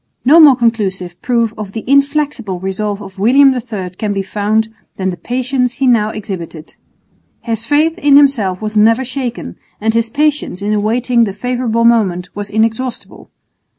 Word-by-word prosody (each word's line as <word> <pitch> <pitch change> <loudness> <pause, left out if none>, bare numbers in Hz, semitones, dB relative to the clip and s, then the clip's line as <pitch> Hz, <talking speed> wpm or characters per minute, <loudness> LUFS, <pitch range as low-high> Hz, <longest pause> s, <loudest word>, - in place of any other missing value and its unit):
No 305 +6 +6
more 295 -5 +8
conclusive 195 -7 -2
proof 235 -3 0
of 200 -2 -7
the 225 - -5
inflexible 280 - 0
resolve 200 +2 -3
of 190 0 -12
William 265 +6 +5
III 220 -7 -5
can 205 +3 -3
be 195 -1 -2
found 215 +3 -1 0.2
than 190 -1 -1
the - - -6
patience 250 +3 -2
he 270 - -2
now 230 -4 +3
exhibited. 180 -7 -7 0.7
His 225 -1 -4
faith 315 +5 +1
in 285 -4 +5
himself 220 -10 +2
was 215 0 -4
never 225 +4 +4
shaken, 250 -2 -5 0.2
and 220 +1 0
his 230 0 0
patience 290 -7 -1
in 210 +1 0
awaiting 235 +3 +1
the 200 - -5
favourable 235 +1 -1
moment 195 -7 +2
was 205 0 -5
inexhaustible. 225 +4 -3
225 Hz, 160 wpm, -15 LUFS, 205-255 Hz, 0.7 s, more